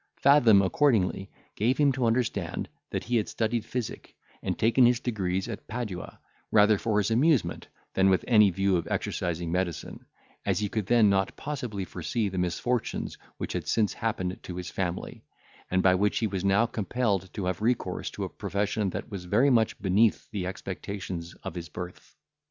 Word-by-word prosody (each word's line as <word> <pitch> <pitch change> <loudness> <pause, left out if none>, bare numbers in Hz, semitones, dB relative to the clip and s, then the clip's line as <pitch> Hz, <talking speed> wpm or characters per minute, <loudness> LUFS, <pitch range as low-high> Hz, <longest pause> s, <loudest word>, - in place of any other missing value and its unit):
Fathom 120 -8 +6
accordingly 95 -4 +2 0.3
gave 120 +5 +1
him 145 -2 +4
to 130 -2 0
understand, 115 +1 -1 0.2
that - - -3
he 120 +1 +1
had 105 - -1
studied 115 0 -1
physic, 120 -1 -5 0.3
and - - -2
taken 115 +3 +4
his 120 -1 +3
degrees 95 -6 -2
at 110 -4 -7
Padua, 105 -6 -5 0.3
rather 105 -1 +5
for 110 -2 0
his 105 +1 +1
amusement, 135 +2 +2 0.3
than 95 0 +4
with 95 - +2
any 105 -4 +6
view 95 0 +1
of 85 - -3
exercising 85 -1 -2
medicine, 85 -3 -3 0.4
as - - 0
he 105 - 0
then 110 +1 -1
could 115 +1 +5
not 95 -1 +2
possibly 125 -10 -4
foresee 100 +5 -2
the 95 -1 -3
misfortunes 105 +7 -1 0.2
which - - -4
had - - -3
since 110 -3 +2
happened 95 -5 -2
to 90 - -7
his 90 -1 -5
family, 90 -2 -4 0.5
and 95 0 +1
by 95 - +6
which 100 +2 +1
he 115 - +1
was 95 -3 -2
now 100 +4 +4
compelled 105 -4 -1
to 100 - -3
have 90 +3 -2
recourse 120 +2 0
to - - -5
a - - -3
profession 100 0 -1
that 100 - -6
was 95 -3 -6
very 135 +10 +3
much 115 -3 +2
beneath 105 +3 +2
the 95 -4 -3
expectations 95 -2 -6
of - - -5
his 85 -2 -6
birth. 90 +3 -8
105 Hz, 180 wpm, -28 LUFS, 95-115 Hz, 0.5 s, Fathom